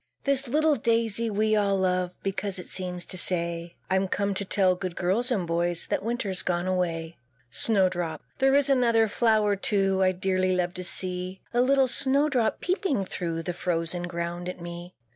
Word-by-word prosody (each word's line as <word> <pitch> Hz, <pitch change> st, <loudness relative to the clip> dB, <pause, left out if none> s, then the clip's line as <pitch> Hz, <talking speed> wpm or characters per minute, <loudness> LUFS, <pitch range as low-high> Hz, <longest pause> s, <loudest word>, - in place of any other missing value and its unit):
This 275 Hz, -1 st, +1 dB
little 300 Hz, +3 st, +2 dB
Daisy 230 Hz, 0 st, 0 dB
we 215 Hz, +1 st, +1 dB
all 200 Hz, -2 st, +2 dB
love, 180 Hz, -1 st, 0 dB
Because 195 Hz, 0 st, -2 dB
it 180 Hz, -, -8 dB
seems 180 Hz, -1 st, -3 dB
to 185 Hz, -, 0 dB
say, 170 Hz, -1 st, +1 dB
"I'm 190 Hz, +1 st, +1 dB
come 200 Hz, +1 st, -1 dB
to 195 Hz, -, -1 dB
tell 190 Hz, -1 st, +2 dB
good 180 Hz, -1 st, -5 dB
girls 195 Hz, +8 st, 0 dB
and 205 Hz, -8 st, 0 dB
boys, 170 Hz, 0 st, -1 dB
That -, -, 0 dB
Winter's 210 Hz, -4 st, -2 dB
gone 175 Hz, -1 st, -1 dB
away." 170 Hz, -3 st, -2 dB, 0.3 s
SNOWDROP. 180 Hz, -, +1 dB, 0.2 s
There 270 Hz, 0 st, +4 dB
is 285 Hz, 0 st, +3 dB
another 235 Hz, -5 st, +3 dB
flower, 215 Hz, -1 st, +2 dB
too, 195 Hz, -1 st, +1 dB
I 185 Hz, 0 st, +4 dB
dearly 185 Hz, 0 st, 0 dB
love 180 Hz, -1 st, -1 dB
to 185 Hz, -, -5 dB
see; 180 Hz, +1 st, +2 dB
The 240 Hz, -, +2 dB
little 270 Hz, +1 st, +3 dB
Snowdrop, 270 Hz, -1 st, +1 dB
peeping 355 Hz, -, -1 dB
through 165 Hz, -2 st, -4 dB
The 175 Hz, -, -3 dB
frozen 175 Hz, 0 st, -2 dB
ground 175 Hz, +1 st, -4 dB
at 180 Hz, -, -7 dB
me. 175 Hz, +1 st, -8 dB
190 Hz, 175 wpm, -26 LUFS, 175-225 Hz, 0.3 s, There